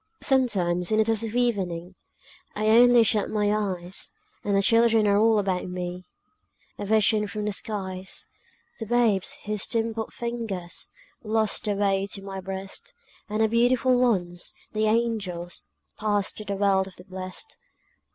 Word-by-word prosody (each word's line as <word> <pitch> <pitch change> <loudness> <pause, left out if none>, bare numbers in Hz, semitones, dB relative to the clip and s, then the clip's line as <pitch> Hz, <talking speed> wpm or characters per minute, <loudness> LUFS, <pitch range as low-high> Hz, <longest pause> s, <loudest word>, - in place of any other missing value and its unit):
Sometimes, 185 -10 +2
in 215 - +3
the 220 - +5
dusk 225 -1 0
of 225 +1 -5
evening, 190 -8 -1 0.6
I 215 +1 +1
only 240 +1 +7
shut 210 -2 +1
my 210 -1 +1
eyes, 190 -3 -3 0.3
And 200 -1 0
the 195 - +3
children 230 0 +4
are 200 0 +4
all 225 0 +4
about 190 -3 0
me, 180 0 -5 0.7
A 205 - -4
vision 215 0 +3
from 210 +1 -4
the 210 - 0
skies: 190 -3 -3 0.5
The 225 - -5
babes 225 -5 +2
whose 210 -1 -2
dimpled 225 -1 -2
fingers 225 -7 -4 0.3
Lost 220 -1 +1
the 205 -1 0
way 195 -1 +1
to 195 - -5
my 195 -1 -6
breast, 190 +1 -6 0.3
And 215 +1 +1
the - - +4
beautiful 245 +3 +3
ones, 175 -8 0 0.2
the 215 0 +1
angels, 210 -7 -1 0.3
Passed 205 -2 +1
to 215 - -6
the 200 - -2
world 195 -1 +2
of 190 - -11
the 180 - -13
blest. 185 - -6
210 Hz, 155 wpm, -26 LUFS, 190-225 Hz, 0.7 s, only